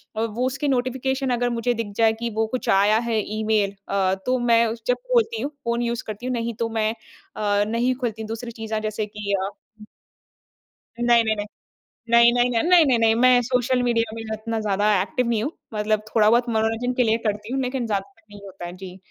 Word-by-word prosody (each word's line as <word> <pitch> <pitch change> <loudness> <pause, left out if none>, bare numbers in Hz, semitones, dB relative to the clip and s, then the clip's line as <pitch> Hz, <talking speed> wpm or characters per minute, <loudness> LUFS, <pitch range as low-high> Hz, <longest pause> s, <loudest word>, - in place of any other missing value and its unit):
अ, 220 - -1
वो 230 +2 -1
उसके 275 +3 -2
नोटिफ़िकेशन 265 +1 -1
अगर 245 0 0
मुझे 240 +1 0
दिख 230 -3 -4
जाए 225 -1 +4
कि 235 0 -2
वो 225 0 +1
कुछ 255 +3 -4
आया 205 +2 +4
है 225 - +1 0.2
ईमेल 215 -2 +1
अ, 190 -1 +1
तो 255 0 +1
मैं 235 -1 +4
उस 225 +1 -5
जब 250 - +2 0.2
खोलती 460 -1 +2
हूँ, 285 - -3
फ़ोन 235 0 0
यूज 235 0 -2
करती 215 +1 -8
हूँ, 255 - -1
नहीं 235 -1 -2
तो 230 - 0
मैं 220 -1 0 0.4
अ, 205 -1 +1
नहीं 235 +3 +1
खोलती 230 -4 -4
हूँ 220 - -6
दूसरी 230 +2 -6
चीज़ें 220 -1 -4
अ, - - 0
जैसे 215 0 -2
कि 205 -1 -5
अ 200 - -4 1.5
नहीं, 240 -1 +4
नहीं, 220 0 +1
नहीं। 205 0 -4 0.6
नहीं, 235 0 +6
नहीं, 245 0 +2
न 230 +3 +1
नहीं, 350 -3 +6
नहीं, 255 -3 +3
नहीं 225 -1 +4
मैं 250 +1 +5
सोशल 250 +1 +1
मीडिया 230 -2 0
में 225 - -6
इतना 220 +1 -3
ज़्यादा 205 -1 0
एक्टिव 235 +5 -1
नहीं 225 -2 0
हूँ। 285 - -2 0.2
मतलब 210 0 0
थोड़ा 215 -2 +4
बहुत 240 +2 +3
मनोरंजन 225 +2 0
के 250 - +2
लिए 225 -1 +2
करती 210 +2 -3
हूँ 270 - 0
लेकिन 255 -1 -2
ज़्यादातर 220 +2 -4
नहीं 205 - -12
होता 190 -2 -9
है। 175 - -7
जी। 185 -1 -9
230 Hz, 220 wpm, -23 LUFS, 215-245 Hz, 1.5 s, नहीं